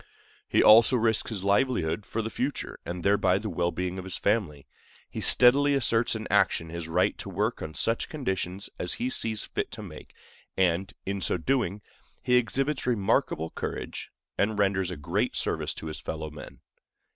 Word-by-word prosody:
He - - +4
also 115 +4 +7
risks 110 -2 +1
his 105 -5 -4
livelihood 100 -4 +1
for 115 - -2
the 110 - -4
future, 135 +5 -3
and 85 0 -5
thereby 95 -2 +3
the 105 +1 -4
well 85 0 0
being 90 +2 -3
of - - -6
his 95 -1 -2
family. 95 -10 -1 0.4
He - - -6
steadily 140 +3 +5
asserts 115 -3 +1
in 110 0 -5
action 80 - +2
his 85 0 -5
right 80 - +1
to - - -6
work - - -1
on 80 -1 -6
such 115 0 0
conditions 95 - -2
as 90 - +1
he 125 +2 -2
sees 110 -3 +1
fit - - -3
to - - -7
make, - - -11 0.4
and, 95 0 +1
in 100 0 -3
so 90 - 0
doing, 105 -1 -1 0.4
he 125 - 0
exhibits 130 +3 +1
remarkable 95 -8 +1
courage, - - -5 0.3
and 105 +1 +1
renders 95 -2 +1
a 90 - -5
great 75 - -1
service - - -1
to - - -8
his 80 -1 -3
fellow 80 -1 -5
men. 75 - -11
100 Hz, 180 wpm, -27 LUFS, 90-115 Hz, 0.4 s, also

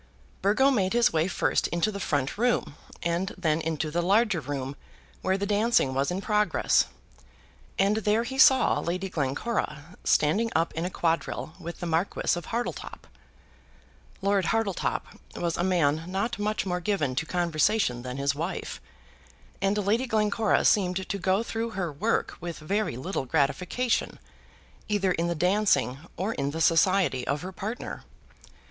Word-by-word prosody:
Burgo 220 +8 +4
made 195 -6 +1
his 240 -5 +3
way 160 +1 +2
first 185 - +1
into 170 +5 0
the 200 - -6
front 145 -8 -1
room 240 -9 0 0.3
and 170 +3 -1
then 165 -3 +1
into 160 -1 -2
the 175 +2 0
larger 200 +1 +3
room 135 -1 -4 0.5
where 190 0 +1
the 200 - -2
dancing 210 - +2
was 135 +1 0
in 180 +2 -2
progress, 210 0 +2 0.9
and 200 +2 +3
there 220 +1 +2
he 265 +2 -5
saw 265 0 +6
Lady 185 +3 -2
Glencora 150 - -3
standing 210 +10 +2
up 165 +1 +1
in 165 +2 -2
a - - -1
quadrille 165 -2 -1
with 170 -1 -8
the - - -2
Marquis 170 +3 0
of 175 -2 -6
Hartletop. 235 +1 -4 1.2
Lord 200 -2 +2
Hartletop 225 -3 0 0.3
was 170 -1 -1
a 175 - -1
man 165 -4 +2
not 195 +5 -2
much 210 -1 -1
more 180 -1 -1
given 175 -8 0
to 160 +5 -2
conversation 170 - +1
than 125 +1 -6
his 140 0 +1
wife, 165 +5 -4 0.8
and 195 +1 +1
Lady 215 +6 +1
Glencora 215 -1 +2
seemed 190 -2 +2
to 200 - -2
go 190 +4 +1
through 230 0 -3
her 180 -4 -1
work 140 - 0
with 170 -1 -5
very 195 - -1
little 135 +1 -3
gratification 160 - 0 0.7
either 200 -3 +1
in 170 -1 0
the 170 - -1
dancing 175 -7 +2 0.2
or 200 +5 -1
in 140 -5 -2
the 160 +3 -4
society 165 -5 +3
of 140 +3 -1
her 185 - -5
partner. 215 +5 -6
185 Hz, 155 wpm, -27 LUFS, 160-210 Hz, 1.2 s, saw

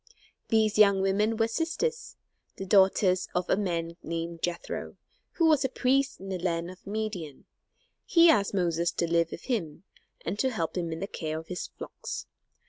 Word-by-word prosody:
These 215 -1 +2
young 200 -2 +6
women 210 +3 +1
were 225 0 +2
sisters, 385 - -2 0.4
the 195 - -6
daughters 190 -1 +4
of 180 0 0
a - - +5
man 170 -4 -2
named 165 0 -4
Jethro, 175 -1 -4 0.4
who 335 - +2
was 305 -3 +4
a 265 - +1
priest 270 +2 +1
in 195 - -8
the 185 -1 -3
land 170 0 -1
of 185 - -16
Midian. 200 -9 -4 0.6
He 340 -1 +5
asked 205 -11 +3
Moses 170 -2 +1
to - - 0
live 170 0 +2
with - - -8
him, 180 - -3 0.4
and 205 - -3
to 265 - +2
help 165 -9 -3
him 170 -2 -2
in 160 +1 -5
the - - -1
care 155 -5 -4
of 160 0 -9
his 180 - -4
flocks. - - -7
190 Hz, 180 wpm, -28 LUFS, 170-220 Hz, 0.6 s, young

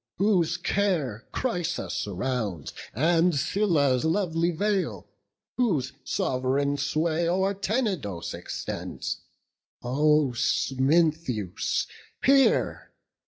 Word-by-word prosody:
whose 180 -4 +2
care 170 - -1
Chrysa 175 -9 -2
surrounds, 100 - -3 0.2
and 165 - +3
Cilia's 145 -5 +2
lovely 165 -1 +1
vale; 195 +3 -1 0.5
Whose 175 - +1
sov'reign 135 +3 0
sway 160 +3 0
o'er 190 +3 +1
Tenedos 195 - -2
extends; - - -5 0.6
O 150 +2 +3
Smintheus, 135 - +1 0.4
hear! 275 0 +3
160 Hz, 75 wpm, -26 LUFS, 130-185 Hz, 0.6 s, and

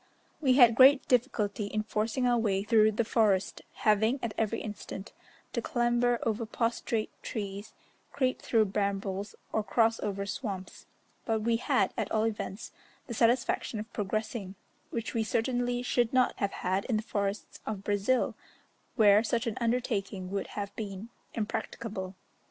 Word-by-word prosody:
We 265 -4 +4
had 245 -3 +7
great 265 +3 +7
difficulty 220 -5 +1
in 215 +1 -2
forcing 220 +4 -1
our 240 -1 +3
way 200 -3 +1
through 215 0 +4
the 225 +2 0
forest, 210 -5 +2
having, 220 +4 +2
at 230 -2 -2
every 225 0 0
instant, 205 -1 -7 0.4
to - - -1
clamber 240 -3 +2
over 225 0 0
prostrate 230 -1 -1
trees, 205 -1 -5 0.4
creep 255 -2 0
through 225 -2 +3
brambles 200 0 -2 0.2
or 220 - +1
cross 225 +3 +2
over 200 -1 -2
swamps, 200 -5 -5 0.4
but 220 -2 0
we 230 +1 +2
had, - - +1
at - - -2
all 215 -1 +2
events, 215 -2 -3 0.3
the 240 - -6
satisfaction 235 -1 +1
of 220 +2 -8
progressing, 210 -1 -3 0.3
which 230 -1 -4
we 225 -2 +1
certainly 245 +3 0
should 240 -2 +1
not 255 -1 +3
have 200 -1 -1
had 190 +2 +1
in 235 -4 +1
the 215 - -2
forests 200 -1 -3
of 205 -3 -4
Brazil, 205 +6 +1 0.6
where 210 -1 +6
such 235 +1 0
an 230 -2 -2
undertaking 215 -6 -1
would 200 0 -2
have 200 -1 -4
been 205 0 -6 0.3
impracticable. 210 -3 -4
220 Hz, 150 wpm, -30 LUFS, 200-235 Hz, 0.6 s, had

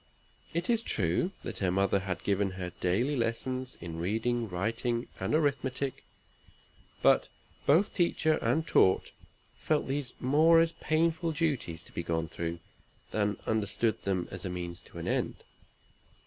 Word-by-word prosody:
It 170 +2 -1
is 230 -2 +2
true 95 - 0
her 105 -6 -1
mother 100 +2 +2
had 95 -2 -4
given 100 0 +1
her 90 -1 -5
daily 115 +11 +1
lessons 130 +2 -2
in 85 -1 -6
reading, 115 +5 0
writing, 115 +6 -1
and - - 0
arithmetic; 140 -3 0 1.0
but - - +5 0.4
both 165 +9 +4
teacher 165 -3 +2
and 135 +8 +1
taught 95 - +3 0.5
felt 155 -1 +1
these 135 -2 -2
more 155 +6 +5
as 165 0 +3
painful 165 +1 +1
duties 140 - -1
to - - -15
be - - -3
gone 80 -1 -1
through, 85 0 -4 0.5
than 105 -1 0
understood 110 +1 0
them 95 -3 -1
as 95 -1 -6
means 90 -2 -4
to - - -14
an - - -5
end. - - -1
115 Hz, 140 wpm, -30 LUFS, 95-150 Hz, 1.0 s, but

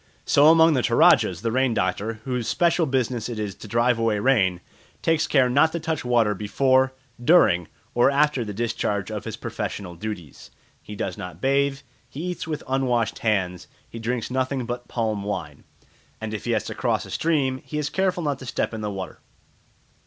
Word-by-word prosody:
So 145 +2 +5
among 160 0 +6
the 130 - +2
Toradjas 90 -5 +4
the 115 - 0
rain 130 -1 +1
doctor, 100 +5 -1
whose 125 -3 -2
special 170 +7 +2
business 125 -3 -1
it 120 - -5
is 105 -2 -3
to 110 - -12
drive 115 +2 +2
away 115 -2 +1
rain, 100 -6 +2 0.4
takes 165 -1 +2
care 135 -3 +4
not 145 +6 +3
to 170 - -2
touch 160 -1 -2
water 120 -4 +2
before, 130 +6 +2 0.3
during, 105 - +4 0.3
or 120 +2 +4
after 140 -2 +2
the 105 - -5
discharge 105 -2 -2
of - - -5
his - - -4
professional 95 -4 -5
duties. 85 -5 -7 0.3
He 105 - -9
does 90 - -4
not 90 - -7
bathe, 140 +1 +1 0.3
he 145 +6 -7
eats 175 - -6
with 155 -2 -4
unwashed 125 -4 0
hands, 95 -5 -1 0.2
he 115 - -9
drinks 115 +1 -3
nothing 130 0 -1
but 120 0 -5
palm 110 -3 -2
wine, 85 -8 -5 0.5
and 110 -1 -5
if 105 - -5
he - - 0
has - - 0
to - - -6
cross - - -1
a - - -11
stream 140 -5 0
he 150 - -6
is 150 -1 -2
careful 190 -2 0
not 145 -3 -1
to 130 - -9
step - - -2
in 110 - -5
the 105 - -2
water. 95 -2 -6
120 Hz, 190 wpm, -24 LUFS, 105-140 Hz, 0.5 s, among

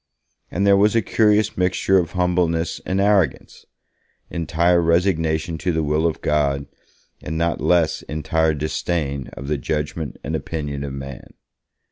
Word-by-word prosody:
And 100 +4 -1
there 100 0 +6
was 105 +3 +3
a 115 - +3
curious 105 0 +2
mixture 95 +1 +2
of 85 -1 -3
humbleness 90 -2 0
and 95 +1 0
arrogance; 100 -7 +1 0.6
entire 85 +2 +2
resignation 80 -2 +1
to 90 - 0
the 80 -1 0
will 75 +2 +1
of 80 - -3
God 70 -2 +1 0.6
and 80 +2 -4
not 85 +1 0
less 85 -3 +2
entire 80 +1 0
disdain 75 -2 -2
of 70 - -8
the 75 -1 -1
judgement 75 -1 -3
and - - -3
opinion 75 -3 -4
of 70 -1 -5
man. 70 -1 -9
80 Hz, 145 wpm, -21 LUFS, 75-90 Hz, 0.6 s, there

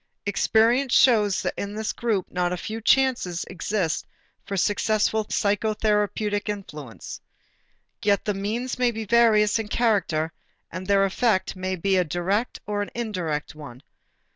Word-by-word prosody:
Experience 230 +6 +2
shows 210 -6 +4
that - - -1
in 200 +1 -5
this 220 0 -2
group 220 -6 -1
not 180 -1 0
a 180 - -2
few 220 +5 -5
chances 240 -9 +2
exist 185 -2 -2 0.4
for 200 - -4
successful 215 +2 +1
psychotherapeutic 210 0 0
influence. 150 - -7 0.8
Yet 200 -1 +1
the 210 - 0
means 225 +6 -3
may 250 -1 +3
be 225 -1 -4
various 220 -1 +4
in 220 - -4
character 190 -9 0 0.4
and 185 0 -6
their 200 -1 +4
effect 195 -1 0
may 185 0 -2
be 190 +2 +1
a 180 - +3
direct 180 +8 -1
or 205 0 -2
an 205 - -4
indirect 180 -10 -3
one. 145 -4 -11
205 Hz, 140 wpm, -24 LUFS, 185-220 Hz, 0.8 s, shows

